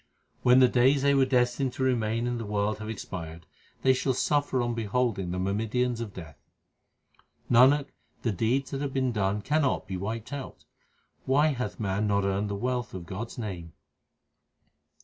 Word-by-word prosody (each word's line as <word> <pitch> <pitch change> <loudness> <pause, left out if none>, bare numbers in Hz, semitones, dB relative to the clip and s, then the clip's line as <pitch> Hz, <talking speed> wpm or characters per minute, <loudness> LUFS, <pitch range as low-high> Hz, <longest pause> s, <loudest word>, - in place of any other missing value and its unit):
When 125 0 +5
the 130 -1 +7
days 130 +3 +3
they 140 0 +4
were 135 -1 +4
destined 125 0 +1
to 130 - -3
remain 115 -2 +1
in 120 -1 -2
the 115 - -5
world 105 +1 -1
have 110 0 -6
expired, 85 -6 -7 0.4
they 130 - +5
shall 130 0 0
suffer 145 -1 +1
on 120 -1 0
beholding 115 -3 -1
the 90 - -3
myrmidons 115 +6 -1
of 110 -3 -5
Death. 80 -6 -10 1.1
Nanak, 135 +4 +5 0.3
the 115 - +1
deeds 120 +7 0
that 135 -1 -3
have 140 -2 -3
been 130 -2 +1
done 105 -1 -1
cannot 150 0 +1
be 95 - -4
wiped 110 +7 -5
out; 140 -2 -7 0.6
why 145 +4 +3
hath 120 -10 -3
man 100 0 0
not 100 -1 +1
earned 100 +1 0
the 100 - -2
wealth 125 +1 -2
of 90 -2 -6
God 95 +7 -5
s - - -13
name 90 -8 -6
115 Hz, 175 wpm, -28 LUFS, 100-130 Hz, 1.1 s, the